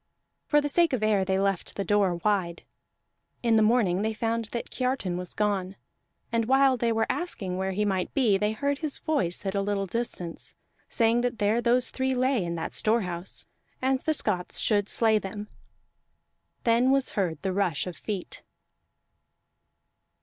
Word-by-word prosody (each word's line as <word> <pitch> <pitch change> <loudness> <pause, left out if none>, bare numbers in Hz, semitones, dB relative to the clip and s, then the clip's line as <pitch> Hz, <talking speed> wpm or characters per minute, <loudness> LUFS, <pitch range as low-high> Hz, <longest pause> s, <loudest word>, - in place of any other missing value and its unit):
For 295 -1 +4
the 290 - -1
sake 335 +1 +2
of 235 -4 0
air, 210 -3 +3
they 190 0 0
left 195 -2 -1
the 200 - -2
door 200 -3 +2
wide. 175 -2 -1 0.8
In 230 -1 +3
the 220 - +5
morning 215 -5 +3
they 220 +1 -1
found 230 +1 -1
that 235 +2 -6
Kiartan 255 -8 -1
was 180 0 -5
gone; 200 -3 -1 0.6
and 230 -1 +1
while 265 +2 +4
they 235 -1 0
were 225 0 +1
asking 205 - -3
where 190 +1 -2
he 210 +2 0
might 190 -3 -1
be, 240 -8 +3
they 210 +2 +1
heard 280 +4 -1
his 310 -3 -3
voice 195 - -1
at 190 - -1
a 200 - 0
little 200 0 -1
distance, 185 -5 -4 0.3
saying 230 0 +3
that 245 -1 -1
there 215 +2 +2
those 245 +1 +2
three 260 0 -1
lay 255 -4 +1
in 170 0 -3
that 165 -1 -4
storehouse, 190 -5 0 0.3
and 260 0 +1
the 315 +3 +1
Scots 180 -9 -1
should 205 -2 +1
slay 220 -2 +3
them. 205 +2 -7 1.1
Then 235 +2 +3
was 270 0 +2
heard 175 -6 -1
the 190 -1 -1
rush 185 -6 0
of 180 -2 -6
feet. 200 -4 -5
215 Hz, 170 wpm, -27 LUFS, 190-245 Hz, 1.1 s, the